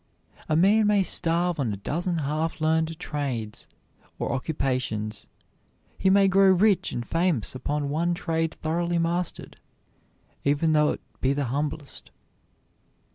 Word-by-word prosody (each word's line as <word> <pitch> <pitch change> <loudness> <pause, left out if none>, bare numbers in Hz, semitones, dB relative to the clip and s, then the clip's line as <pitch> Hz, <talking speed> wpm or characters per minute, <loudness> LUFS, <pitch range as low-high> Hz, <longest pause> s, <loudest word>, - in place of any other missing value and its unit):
A 155 - +2
man 205 +6 +4
may 205 -2 +4
starve 170 -1 +1
on 125 -6 0
a 100 - -4
dozen 170 - -2
half 155 +3 -2
learned 160 0 +1
trades 135 -10 -4 0.5
or - - -2
occupations; 130 -7 -2 0.7
he 190 - +3
may 195 0 +5
grow 195 0 +5
rich 200 +1 +3
and 120 - -4
famous 165 - 0
upon 145 +3 -2
one 170 +3 0
trade 165 -2 -1
thoroughly 170 +2 -1
mastered, 170 +1 -2 0.9
even 145 +3 +2
though 150 -1 +3
it - - -9 0.2
be 135 +1 +2
the 140 0 -1
humblest. 145 0 -4
160 Hz, 130 wpm, -26 LUFS, 140-175 Hz, 0.9 s, may